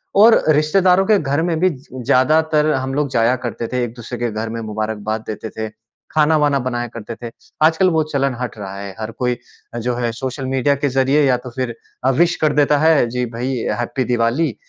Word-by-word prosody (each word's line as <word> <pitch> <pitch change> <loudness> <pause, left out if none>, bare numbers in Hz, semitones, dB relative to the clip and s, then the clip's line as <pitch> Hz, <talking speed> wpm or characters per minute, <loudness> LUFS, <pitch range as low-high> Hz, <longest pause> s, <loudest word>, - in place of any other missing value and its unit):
और 220 +3 +6
रिश्तेदारों 180 +5 +3
के 215 -2 +5
घर 145 0 0
में 165 -2 0
भी 185 - +4
ज 135 -6 -9 0.2
ज़्यादातर 155 +4 +3
हम 130 0 -2
लोग 145 -2 0
जाया 120 0 +3
करते 115 -1 -3
थे, 125 -1 -1
एक-दूसरे 120 +1 -7
के 120 -2 -1
घर 110 +1 -4
में 115 +1 -4
मुबारकबाद 110 0 -3
देते 110 +1 -5
थे, 110 0 -5 0.4
खाना-वाना 150 -2 +3
बनाया 120 -1 -2
करते 115 0 -8
थे। 115 - -5 0.3
आजकल 165 +4 +4
वो 160 -1 +2
चलन 135 -2 +1
हट 125 -2 -4
रहा 100 -2 -7
है। 100 -1 -7
हर 110 0 -4
कोई 125 +1 -1 0.4
जो 120 +1 -1
है 120 -1 -1
सोशल 130 +2 -5
मीडिया 135 +2 +1
के 140 +1 -1
ज़रिये 135 +3 +2
या 130 -2 +4
तो 125 +1 -9
फिर 125 -3 -3 0.3
अ, 130 - +5
विश 170 +6 +2
कर 155 -2 +3
देता 145 0 +3
है। 160 -5 +4
जी 125 +1 -1
भई, 125 +3 -3 0.2
हैप्पी 130 +2 -1
दिवाली 120 +6 +1
130 Hz, 205 wpm, -19 LUFS, 115-150 Hz, 0.4 s, और